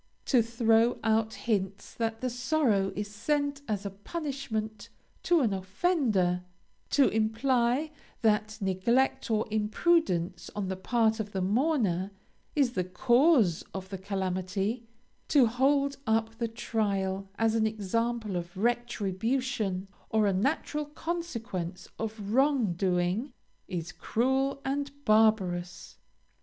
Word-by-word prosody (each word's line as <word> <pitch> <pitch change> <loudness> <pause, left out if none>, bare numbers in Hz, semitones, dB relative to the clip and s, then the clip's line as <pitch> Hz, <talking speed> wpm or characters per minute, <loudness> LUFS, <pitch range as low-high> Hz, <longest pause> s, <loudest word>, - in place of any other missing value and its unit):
To 250 -4 +4
throw 230 0 +3
out 220 0 +1
hints 200 -4 -2
that 225 -1 -2
the 255 - 0
sorrow 245 -6 +1
is 210 +1 -3
sent 285 +7 -1
as 210 -2 -2
a 200 - -3
punishment 220 - -4 0.3
to 345 -3 +3
an 225 -6 +2
offender; 190 - +1 0.5
to 280 -2 +4
imply 240 +6 +1 0.3
that 215 0 +2
neglect 235 +8 +1
or 220 -1 +1
imprudence 210 - +1
on 200 -2 -2
the 190 - -2
part 220 +3 +1
of 210 -1 -4
the 190 - -1
mourner 205 - +1 0.5
is 275 -5 +3
the 185 - 0
cause 240 - +3
of 190 0 -5
the 195 -1 -5
calamity; 195 +4 -2 0.4
to 280 -5 +5
hold 275 +4 +2
up 225 0 +1
the 235 - 0
trial 195 -4 -2
as 225 -1 +2
an 220 -1 +2
example 220 0 -2
of 175 +1 -5
retribution, 225 -2 -1 0.2
or 220 -1 +2
a 200 - +2
natural 295 +8 0
consequence 245 - -4
of 215 -2 -4
wrong 265 -7 +3
doing, 180 - 0 0.3
is 175 -1 -4
cruel, 265 +7 0
and 285 +1 -3
barbarous. 205 -6 +2
220 Hz, 125 wpm, -29 LUFS, 195-255 Hz, 0.5 s, to